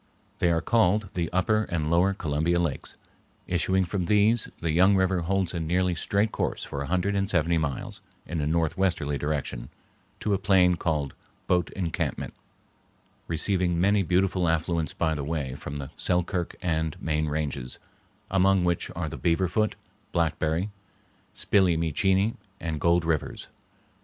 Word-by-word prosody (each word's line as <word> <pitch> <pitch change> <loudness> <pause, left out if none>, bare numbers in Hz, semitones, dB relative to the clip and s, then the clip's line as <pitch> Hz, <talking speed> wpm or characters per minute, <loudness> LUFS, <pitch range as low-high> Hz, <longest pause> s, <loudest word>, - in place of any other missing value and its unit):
They 85 - +3
are 80 -1 +2
called 105 -3 +2
the 85 -3 -1
Upper 110 +4 +2
and 80 -2 -1
Lower 90 +3 +3
Columbia 80 0 0
Lakes. 85 -5 -3 0.5
Issuing 95 +2 +1
from 90 0 -2
these, 105 +3 +3
the 80 - -1
young 95 +5 +5
river 95 -1 +2
holds 95 +1 0
a 85 - -2
nearly 90 +3 +1
straight 100 +6 0
course - - -2
for 70 - -5
a 70 - -4
hundred 95 +4 0
and 100 0 0
seventy 85 -2 +2
miles 70 -4 -4 0.2
in 85 -2 -3
a 75 - -1
northwesterly 80 -2 0
direction 70 -5 -3 0.5
to 105 - 0
a 95 - +1
plain 90 -3 +4
called 75 -5 -1 0.3
"Boat 90 -1 +1
Encampment," 85 -5 -3 0.9
receiving 90 +1 +1
many 100 +3 +3
beautiful 90 0 +1
affluents 80 -1 0
by 80 -2 0
the 75 -2 -3
way 70 -3 -3
from 70 +1 -7
the 70 -2 -6
Selkirk 90 0 0
and 80 -3 -1
main 80 -1 -1
ranges, 70 -4 -3 0.5
among 95 -1 +4
which 85 -1 0
are 85 -1 -2
the - - -6
Beaver 90 +2 +1
Foot, 110 +4 0 0.4
Blackberry, 85 +3 0 0.6
Spill 95 -3 +3
e 85 - +2
Mee 80 -2 -1
Chene, 95 +6 +2 0.2
and 80 -3 -4
Gold 85 0 +3
Rivers. 80 -3 -2
85 Hz, 155 wpm, -26 LUFS, 80-95 Hz, 0.9 s, young